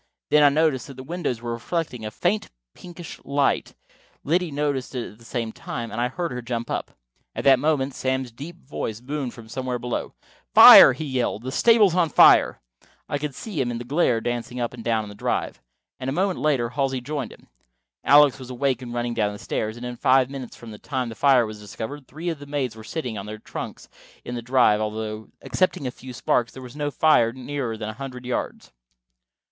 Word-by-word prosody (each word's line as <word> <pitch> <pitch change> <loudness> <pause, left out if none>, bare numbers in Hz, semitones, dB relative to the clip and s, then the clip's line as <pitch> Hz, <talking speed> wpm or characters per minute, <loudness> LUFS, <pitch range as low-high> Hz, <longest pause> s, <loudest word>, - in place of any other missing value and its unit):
Then 150 - +6
I 145 - +7
noticed 145 -4 +1
that 135 - -10
the 130 - -9
windows 145 -6 -3
were 120 - -3
reflecting 125 0 -3
a 110 - -3
faint 180 - -1 0.2
pinkish 175 -1 -10
light, 140 0 0 0.5
Liddy 175 +3 +1
noticed 140 -3 -2
it 125 - -4
at 105 - -19
the - - -17
same 115 -1 -3
time, 115 +1 -6
and 120 - -3
I 120 - +2
heard 170 +6 -4
her 125 - -4
jump 120 -1 -4
up. - - -3 0.4
At - - -3
that 135 -2 +6
moment 140 -2 0
Sam's 130 -1 -2
deep 145 +9 -9
voice 110 -6 -4
boomed 135 0 -4
from 115 -2 -12
somewhere 125 +1 -3
just - - -13
below. 125 -1 -3 0.4
"Fire!" 135 - +11
he 155 +5 -5
yelled. 125 -5 -2
"The 130 - -4
stable's 220 - +5
on 175 -3 +2
fire!" - - +6 0.5
I 145 - -2
could 145 -2 -4
see 195 -11 -4
him 125 - -1
in 120 - -3
the 120 - -6
glare 125 -3 +1
dancing 120 +1 -4
up 120 0 -2
and 120 -2 -9
down 110 -1 +1
on 105 - -9
the - - -9
drive, 100 - -3 0.4
and 130 - -3
a - - -2
moment 185 +3 0
later 135 -6 +1
Halsey 135 +1 -1
joined 140 -1 -4
him. - - -16 0.6
Alex 145 -1 +6
was 130 -1 -9
awake 130 +1 -1
and 120 -1 -7
running 120 0 -1
down 105 -3 0
the - - -8
stairs, 110 +2 -3
and 120 - -7
in 125 0 -6
five 130 +1 +3
minutes 130 -4 -7
from 115 -2 -11
the 105 - -10
time 130 -4 -3
the - - -6
fire 125 +2 +4
was 110 -1 -8
discovered, 110 +7 -7
three 160 +5 -5
of 160 -4 -4
the 145 - -10
maids 140 -5 -2
were 110 - -11
sitting 125 -5 -4
on 100 - -8
their 110 0 -6
trunks 110 - -8 0.4
in 120 - -5
the 120 - -4
drive, 120 -3 +3
although, 110 0 -4 0.2
excepting 185 -6 0
a 125 - -2
few 130 +1 -11
sparks, 120 -1 0
there 130 - -10
was 125 +2 -11
no 145 -1 -2
fire 145 -6 +3
nearer 130 -2 -4
than 110 0 -5
a - - -5
hundred 125 0 -8
yards. 125 - -4
130 Hz, 220 wpm, -24 LUFS, 115-145 Hz, 0.6 s, Fire